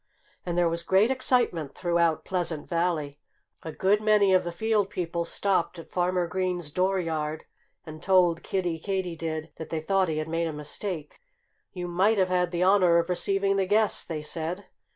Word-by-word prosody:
And 175 0 -2
there 175 -1 +3
was 170 0 -1
great 190 +7 +3
excitement 245 - 0
throughout 170 -2 +1
Pleasant 175 -5 -2
Valley. 165 -4 -1 0.4
A 160 - -6
good 200 +6 +2
many 210 -2 +4
of 185 - +4
the 175 - -4
field 215 +1 0
people 170 -3 -3
stopped 185 -2 -1
at 165 - -11
Farmer 180 0 +1
Green's 180 -2 -2
dooryard 165 -4 -1 0.4
and 155 0 -9
told 180 -3 +3
Kiddie 175 -4 -2
Katydid 165 -4 -3
that 160 - -7
they 160 - -2
thought 190 +2 +1
he 155 - -2
had 155 0 -2
made 165 +1 -1
a 160 - -4
mistake. 150 - -6 0.5
"You 180 -1 -5
might 190 +5 +2
have 185 -1 +2
had 180 -1 +1
the 175 0 -1
honor 185 -3 +5
of 170 +1 +1
receiving 195 +2 +1
the 190 -1 +1
guests," 210 +1 +2
they 155 -3 -5
said. 165 +5 -4
175 Hz, 175 wpm, -27 LUFS, 165-190 Hz, 0.5 s, honor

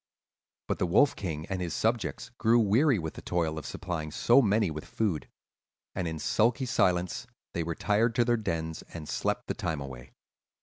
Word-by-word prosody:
"But - - -1
the - - +1
Wolf 135 +11 +4
King 80 -5 -4
and 95 0 -3
his 85 -2 -2
subjects 115 0 -1
grew 115 0 +4
weary 120 +5 +4
with 80 -3 -4
the - - -9
toil 80 -3 -1
of 75 - -8
supplying 85 -4 -4
so 120 - +5
many 105 -5 +2
with 75 0 -5
food; 100 -9 -2 0.6
and 90 -3 -2
in 80 -1 -3
sulky 115 - +2
silence 90 -2 +1 0.3
they 85 - -1
retired 105 +8 +1
to 120 -2 +3
their 120 0 +3
dens 80 -7 -3
and 80 -3 -6
slept - - -1
the - - -2
time 80 -3 -2
away. 65 -3 -9
90 Hz, 180 wpm, -29 LUFS, 80-115 Hz, 0.6 s, so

